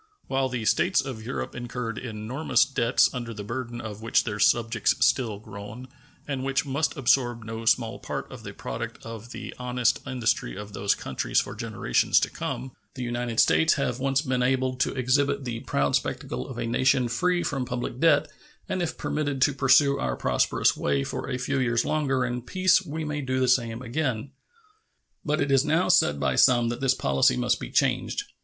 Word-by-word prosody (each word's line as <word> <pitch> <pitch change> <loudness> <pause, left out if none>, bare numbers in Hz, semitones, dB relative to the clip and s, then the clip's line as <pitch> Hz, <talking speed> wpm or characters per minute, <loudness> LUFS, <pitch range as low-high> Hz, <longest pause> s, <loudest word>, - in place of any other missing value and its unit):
While 135 0 0
the 120 -3 -3
States 175 - +3
of 125 -5 -4
Europe 120 - -4
incurred 120 -2 -5
enormous 120 +6 0
debts, 130 -3 +2
under 120 -3 -5
the 105 - -6
burden 120 +2 -5
of 110 -2 -7
which 115 - +2
their 105 -2 -4
subjects 115 -1 +2
still 115 -4 +1
groan, 105 +4 -10 0.4
and 135 -3 -3
which 135 +2 0
must 145 +4 -1
absorb 120 -3 +2
no 115 +1 -6
small 115 0 +1
part - - -5
of - - -9
the - - -7
product - - -6
of 115 0 -8
the - - -7
honest 125 -1 +1
industry 115 - -1
of 105 0 -8
those 100 0 +1
countries - - -1
for - - -3
generations - - +1
to - - -1
come, 130 - -5 0.2
the 130 - -4
United 120 -1 -2
States 160 - +5
have 130 -4 -1
once 135 +2 +1
been 130 -3 0
enabled 130 0 0
to - - +1
exhibit 140 +2 +1
the 115 -2 -3
proud 70 - 0
spectacle 65 +1 -3
of - - -8
a - - -2
nation 125 +1 +2
free 175 +9 0
from 135 -3 -2
public 125 0 -4
debt, 150 -2 +4 0.4
and 185 -1 -2
if 165 -2 -3
permitted 145 -3 -2
to 145 - +3
pursue 140 +1 +4
our 60 -1 -1
prosperous - - +1
way 70 -1 0
for - - -5
a 130 - -1
few 135 +2 -1
years 120 -2 +1
longer 135 -4 0
in 125 0 -3
peace 185 +7 +2
we 160 -1 -5
may 150 0 -3
do 130 -1 -1
the 130 - +2
same 120 -1 +1
again. 125 -1 -2 0.9
But 150 -1 0
it 140 - 0
is 135 -1 +4
now 160 +4 +1
said 75 - +4
by 65 -3 0
some 120 -2 +5
that 120 +1 -4
this 130 -1 +3
policy 70 - +2
must 60 - +1
be - - -6
changed. - - 0
125 Hz, 190 wpm, -26 LUFS, 115-135 Hz, 0.9 s, States